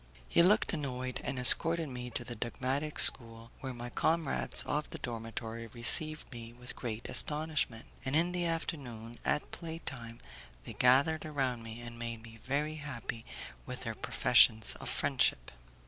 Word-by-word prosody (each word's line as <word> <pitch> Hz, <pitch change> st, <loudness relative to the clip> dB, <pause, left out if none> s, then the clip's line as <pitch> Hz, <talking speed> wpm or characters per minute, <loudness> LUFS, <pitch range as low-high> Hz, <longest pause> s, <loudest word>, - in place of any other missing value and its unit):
He 170 Hz, -, +4 dB
looked 205 Hz, +6 st, +3 dB
annoyed, 130 Hz, -5 st, -5 dB
and 130 Hz, +1 st, -5 dB
escorted 165 Hz, +6 st, +7 dB
me 125 Hz, -2 st, -7 dB
to 120 Hz, -, -4 dB
the 120 Hz, -, -7 dB
dogmatic 135 Hz, +6 st, -4 dB
school, 115 Hz, -1 st, +5 dB
where 130 Hz, -, -6 dB
my 120 Hz, 0 st, -9 dB
comrades 160 Hz, +1 st, -1 dB
of 150 Hz, 0 st, -4 dB
the -, -, -8 dB
dormitory 115 Hz, -1 st, -7 dB
received 150 Hz, +8 st, +5 dB
me 115 Hz, -1 st, -10 dB
with 125 Hz, +1 st, -12 dB
great 115 Hz, -2 st, -6 dB
astonishment, 150 Hz, -6 st, -1 dB, 0.2 s
and 130 Hz, +2 st, -3 dB
in 170 Hz, +3 st, +1 dB
the 175 Hz, -1 st, -2 dB
afternoon, 125 Hz, -9 st, -6 dB
at 150 Hz, -, -2 dB
play 165 Hz, -1 st, -7 dB
time, 115 Hz, -7 st, -8 dB, 0.4 s
they -, -, -9 dB
gathered 140 Hz, +6 st, +2 dB
around 135 Hz, -6 st, -3 dB
me 115 Hz, +1 st, -9 dB
and 120 Hz, 0 st, -11 dB
made 115 Hz, -1 st, -7 dB
me 115 Hz, -1 st, -14 dB
very 150 Hz, +4 st, -3 dB
happy 120 Hz, -6 st, -8 dB, 0.4 s
with -, -, -7 dB
their -, -, -5 dB
professions 110 Hz, -1 st, +2 dB
of -, -, -7 dB
friendship. -, -, 0 dB
125 Hz, 160 wpm, -30 LUFS, 115-150 Hz, 0.4 s, escorted